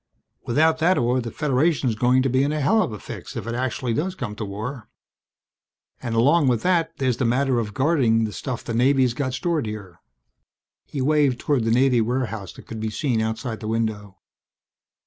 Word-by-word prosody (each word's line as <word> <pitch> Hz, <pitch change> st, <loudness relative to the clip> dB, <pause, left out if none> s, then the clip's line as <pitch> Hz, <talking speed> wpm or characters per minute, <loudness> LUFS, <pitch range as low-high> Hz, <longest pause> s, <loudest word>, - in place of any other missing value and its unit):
Without 160 Hz, +5 st, +3 dB
that 175 Hz, +3 st, +3 dB
ore 125 Hz, +1 st, +1 dB
the 115 Hz, -, -5 dB
Federation's 140 Hz, 0 st, +1 dB
going 125 Hz, +4 st, +2 dB
to -, -, +1 dB
be 130 Hz, +1 st, +2 dB
in 140 Hz, +2 st, +1 dB
a 155 Hz, -, -1 dB
hell 150 Hz, +11 st, +3 dB
of -, -, -1 dB
a 105 Hz, -, -6 dB
fix -, -, -9 dB
if -, -, -5 dB
it 115 Hz, -, -3 dB
actually 125 Hz, 0 st, -2 dB
does 180 Hz, +9 st, -2 dB
come 125 Hz, -, -5 dB
to 105 Hz, -, -5 dB
war. 110 Hz, +5 st, -6 dB, 1.1 s
And 115 Hz, -1 st, -3 dB
along 145 Hz, +6 st, +4 dB
with 120 Hz, -3 st, +1 dB
that 175 Hz, -3 st, +1 dB
there's 130 Hz, -3 st, 0 dB
the 130 Hz, -, 0 dB
matter 130 Hz, +1 st, +2 dB
of 105 Hz, -3 st, -4 dB
guarding 130 Hz, -6 st, +2 dB
the 105 Hz, -2 st, -3 dB
stuff 125 Hz, -3 st, -5 dB
the 115 Hz, -, -4 dB
Navy's 130 Hz, +1 st, +3 dB
got 130 Hz, 0 st, -2 dB
stored 165 Hz, -5 st, -1 dB
here." 100 Hz, -5 st, -8 dB, 0.8 s
He 140 Hz, -, -5 dB
waved 145 Hz, -3 st, +3 dB
toward 135 Hz, -6 st, 0 dB
the -, -, +1 dB
Navy 125 Hz, 0 st, +4 dB
warehouse 110 Hz, -5 st, -2 dB
that -, -, -14 dB
could 115 Hz, -, -7 dB
be 110 Hz, 0 st, -2 dB
seen 120 Hz, 0 st, -1 dB
outside 110 Hz, +1 st, -3 dB
the 110 Hz, -, -6 dB
window. 110 Hz, -3 st, -2 dB
125 Hz, 200 wpm, -23 LUFS, 115-140 Hz, 1.1 s, along